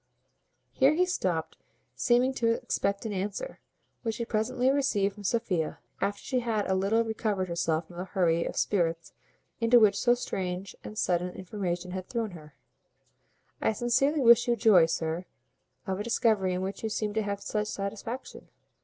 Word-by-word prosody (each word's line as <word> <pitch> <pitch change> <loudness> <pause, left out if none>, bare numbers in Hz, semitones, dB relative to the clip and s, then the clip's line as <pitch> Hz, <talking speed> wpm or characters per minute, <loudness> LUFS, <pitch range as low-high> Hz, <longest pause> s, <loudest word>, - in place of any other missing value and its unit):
Here 275 +3 +4
he 365 +2 +3
stopped, 185 - -2 0.4
seeming 250 +2 +3
to 230 -3 +2
expect 200 0 -2
an 215 - -2
answer, 205 - -4 0.4
which 225 -2 -3
he 235 - -2
presently 245 +3 +1
received 225 -8 +1
from 205 0 -12
Sophia, 195 -7 -1 0.2
after 205 0 -1
she 260 -2 0
had 225 -4 -1
a 190 - +1
little 200 +5 +2
recovered 215 -4 -2
herself 170 -1 0
from 175 +1 -14
the 180 - -4
hurry 170 -3 +1
of - - -5
spirits 170 -4 0 0.5
into 235 +1 +6
which 210 -3 +5
so 240 +4 +3
strange 185 -5 -4
and 215 - -8
sudden 180 -2 0
information 180 -2 -4
had 185 0 -6
thrown 230 -3 -2
her: 150 -4 -13 1.1
"I - - +2
sincerely 260 +7 +2
wish 235 -1 +6
you 240 - +3
joy, 200 -8 +6
sir, 165 +2 -2 0.6
of 190 -1 -2
a - - -2
discovery 215 -5 +2
in 180 - -2
which 195 +1 -4
you 220 - -2
seem 210 -1 -2
to 220 - +1
have 200 -1 -3
such 210 +1 -2
satisfaction. 210 +5 -5
205 Hz, 170 wpm, -28 LUFS, 185-235 Hz, 1.1 s, into